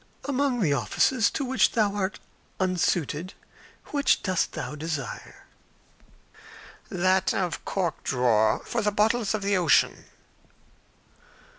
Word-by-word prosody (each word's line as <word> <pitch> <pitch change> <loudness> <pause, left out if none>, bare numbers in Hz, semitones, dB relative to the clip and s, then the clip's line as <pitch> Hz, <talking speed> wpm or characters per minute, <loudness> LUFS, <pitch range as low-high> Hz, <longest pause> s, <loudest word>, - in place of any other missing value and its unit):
"Among 275 -3 0
the 155 -7 +2
offices 220 - +2
to 275 - -3
which 260 +1 +2
thou 210 -4 +2
art 200 -1 -2 0.4
unsuited, 180 -2 -1 0.6
which 285 -2 +2
dost 185 -3 0
thou - - -5
desire?" 150 -4 -6 1.4
"That 185 +1 +1
of 180 -3 -2
cork 175 -6 -2
drawer 115 -4 +2
of 235 -2 0
the 210 - +1
bottles 215 +1 +1
of 210 - -4
the 200 0 +1
ocean." 180 -3 +2
190 Hz, 115 wpm, -26 LUFS, 160-220 Hz, 1.4 s, the